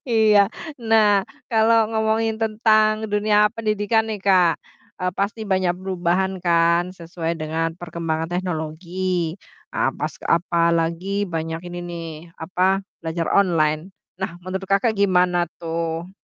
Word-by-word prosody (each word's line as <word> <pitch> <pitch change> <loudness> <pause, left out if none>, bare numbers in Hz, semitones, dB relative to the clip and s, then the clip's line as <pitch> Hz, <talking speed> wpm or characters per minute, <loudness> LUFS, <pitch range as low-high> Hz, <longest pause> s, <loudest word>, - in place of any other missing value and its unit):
Iya. 215 -3 +5 0.3
Nah 215 -4 +3 0.2
kalau 225 -1 +4
ngomongin 220 0 0
tentang 215 0 +2
dunia 210 0 +3
pendidikan 220 0 0
nih 215 -2 -4
Kak, 185 -4 +4 0.5
eee, 180 - +1
pasti 205 +3 -1
banyak 185 -2 +1
perubahan 185 0 -1
kan 170 +1 +2
sesuai 170 -1 -4
dengan 160 +1 -2
perkembangan 165 -1 -4
teknologi. 175 0 -2 0.4
Apas - - -1
apalagi 170 +3 +1
banyak 165 -2 -3
ini 175 0 -6
nih 170 -1 -6 0.3
apa, 185 +3 +1 0.2
belajar 165 0 -2
online. 165 -3 +2 0.3
Nah 175 -2 -4
menurut 190 +2 -4
Kakak 210 +3 +3
gimana 180 -4 +2
tuh? 165 +1 -3
185 Hz, 115 wpm, -22 LUFS, 170-210 Hz, 0.5 s, Iya